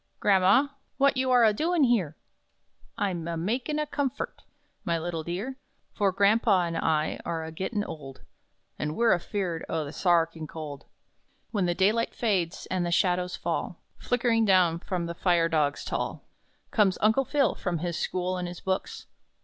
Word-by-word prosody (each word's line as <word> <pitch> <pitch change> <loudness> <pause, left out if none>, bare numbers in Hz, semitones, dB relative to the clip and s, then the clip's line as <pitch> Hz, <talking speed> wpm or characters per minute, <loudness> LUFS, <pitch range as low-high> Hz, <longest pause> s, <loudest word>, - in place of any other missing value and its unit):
"Gramma, 205 +9 +4 0.2
what 280 0 +4
you 260 0 0
are 250 -2 +5
a 215 - +4
doin' 325 +6 +1
here?" 205 - +2 0.8
"I'm 180 -5 -2
a 170 -1 -2
makin' 245 - -1
a 300 - 0
'comfort,' 285 -2 -3 0.4
my 170 -1 0
little 165 0 -3
dear; 200 +11 -4 0.4
For 200 -2 +2
grandpa 200 0 +3
and 165 -1 -3
I 155 -1 0
are 165 -1 -3
a 160 - -7
gittin' 200 +6 -2
old. 135 -8 -9 0.6
And 150 +1 -2
we're 235 -1 +4
afeared 175 -2 -2
o' 160 -2 -1
the 140 - -7
Sa 185 - -1
archin' 165 -2 +2
Cold." 150 -4 -8 0.7
When 200 -5 0
the 175 - 0
daylight 215 +5 +1
fades, 190 -7 -1
and 185 -1 0
the 175 - -1
shadows 180 +1 +1
fall - - -3 0.2
Flickering 235 -2 +1
down 180 -5 +4
from 175 -1 -3
the 170 - -4
fire 170 -1 +2
dogs 150 -3 0
tall, - - -3 0.5
Comes 200 -4 +3
Uncle 220 +6 +3
Phil, 275 -4 +1
from 175 -2 -3
his 170 +1 -3
school 185 +2 -2
and 180 -1 -3
his 175 0 -7
books. 190 0 -3
185 Hz, 170 wpm, -27 LUFS, 165-225 Hz, 0.8 s, are